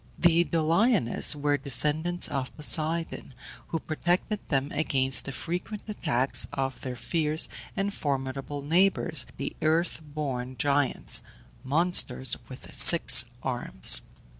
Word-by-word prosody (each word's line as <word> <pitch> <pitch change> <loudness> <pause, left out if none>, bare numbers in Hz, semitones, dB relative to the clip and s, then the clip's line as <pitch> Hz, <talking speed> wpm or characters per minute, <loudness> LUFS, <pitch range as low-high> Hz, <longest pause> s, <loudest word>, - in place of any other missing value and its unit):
The 170 0 +3
Doliones 165 - +2
were 145 0 0
descendants 150 +6 -1
of 130 -2 -5
Poseidon, 155 -2 0 0.3
who 165 - -3
protected 175 +7 -2
them 135 -1 -1
against 135 -4 +1
the 140 - -5
frequent 180 +8 -5
attacks 140 - 0
of 135 -1 -4
their 125 -1 -6
fierce 155 +5 0 0.3
and 200 +1 -2
formidable 135 -1 -4
neighbours, 165 -3 +3
the 140 - -6
earth 160 +1 0
born 135 -4 -6
Giants 145 -1 +1 0.4
monsters 140 -4 0
with 130 - -11
six 170 -7 +7 0.2
arms. 120 - +2
150 Hz, 115 wpm, -26 LUFS, 135-170 Hz, 0.4 s, six